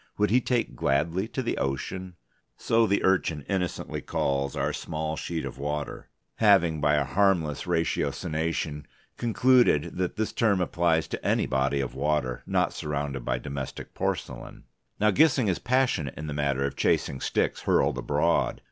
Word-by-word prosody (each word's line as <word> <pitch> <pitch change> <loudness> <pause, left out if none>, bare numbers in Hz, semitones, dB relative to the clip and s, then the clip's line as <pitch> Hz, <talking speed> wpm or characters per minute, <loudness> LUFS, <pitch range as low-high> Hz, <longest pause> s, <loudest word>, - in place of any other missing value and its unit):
Would 105 0 +2
he 125 +2 +4
take 120 -1 -1
gladly 85 +8 0
to 130 +2 -4
the 120 - -2
ocean? 90 +7 -3 0.4
(So 115 0 +2
the 100 - +1
Urchin 85 -6 +1
innocently 90 -4 -2
calls 70 0 -1
our - - -1
small 80 0 -3
sheet 80 +2 -4
of - - -7
water, 75 +1 -4 0.3
having 90 -8 +4
by 75 0 +3
a 75 - +2
harmless 85 -2 +1
ratiocination 80 -2 -1 0.3
concluded 120 - +3
that 90 -1 -1
this 110 0 -1
term 110 -5 +2
applies 85 -2 +1
to - - -5
any - - +2
body 70 +1 0
of 65 - -4
water 70 -3 -1
not - - +1
surrounded 70 -3 -3
by - - -1
domestic 70 -1 -6
porcelain.) - - -4 0.4
Now 105 +1 +4
Gissing 135 -2 +4
is 95 - 0
passionate 125 - 0
in 75 - -5
the 75 - -4
matter 70 -2 0
of 70 - -3
chasing 65 - 0
sticks - - 0
hurled - - +2
abroad. 75 +4 +1
80 Hz, 155 wpm, -27 LUFS, 70-100 Hz, 0.4 s, he